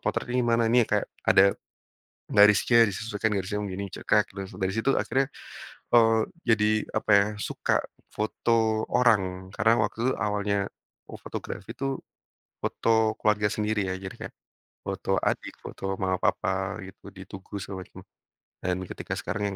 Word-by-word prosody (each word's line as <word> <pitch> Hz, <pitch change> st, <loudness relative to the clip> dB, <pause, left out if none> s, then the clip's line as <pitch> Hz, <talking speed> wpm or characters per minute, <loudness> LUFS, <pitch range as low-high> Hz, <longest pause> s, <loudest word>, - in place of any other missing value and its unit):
potretnya 125 Hz, +1 st, -1 dB
gimana?" 115 Hz, -1 st, +2 dB
"Ini 125 Hz, +1 st, +5 dB
kayak 105 Hz, 0 st, +1 dB, 0.2 s
ada 100 Hz, +1 st, +6 dB, 0.8 s
garisnya 105 Hz, +3 st, +6 dB
disesuaikan 105 Hz, +1 st, -2 dB
garisnya 100 Hz, +1 st, -2 dB
begini." 100 Hz, 0 st, -4 dB
Cekrek. -, -, +1 dB
Dari 95 Hz, 0 st, -4 dB
si -, -, -11 dB
dari 95 Hz, 0 st, 0 dB
situ 115 Hz, +5 st, +2 dB
akhirnya, 135 Hz, +1 st, +1 dB, 0.7 s
eee, 115 Hz, -1 st, +6 dB, 0.3 s
jadi 110 Hz, -2 st, +3 dB, 0.2 s
apa 110 Hz, -, -1 dB
ya 100 Hz, -, +3 dB, 0.2 s
suka -, -, 0 dB, 0.3 s
foto 110 Hz, 0 st, +1 dB
orang. 95 Hz, -6 st, +2 dB
Karena 115 Hz, 0 st, +3 dB
waktu 105 Hz, +2 st, -2 dB
itu -, -, +1 dB
awalnya 100 Hz, 0 st, 0 dB, 0.5 s
o -, -, -7 dB
fotografi -, -, -7 dB
tuh, 135 Hz, 0 st, -2 dB, 0.6 s
foto 110 Hz, -1 st, +1 dB
keluarga 105 Hz, -1 st, +2 dB
sendiri 105 Hz, -2 st, -1 dB
ya. 95 Hz, -, -2 dB
Jadi 95 Hz, 0 st, -7 dB
kayak -, -, -25 dB, 0.5 s
foto -, -, -1 dB
adik, -, -, -2 dB
foto 95 Hz, 0 st, -4 dB
mama 95 Hz, -1 st, 0 dB
papa 95 Hz, +1 st, 0 dB
gitu, 95 Hz, +1 st, -13 dB
di 95 Hz, -1 st, -10 dB
tugu 95 Hz, +1 st, -8 dB
segala 95 Hz, 0 st, -6 dB
macam. -, -, -13 dB, 0.6 s
Dan 90 Hz, 0 st, -1 dB
ketika -, -, -5 dB
sekarang 105 Hz, -, -3 dB
105 Hz, 145 wpm, -27 LUFS, 95-115 Hz, 0.8 s, ada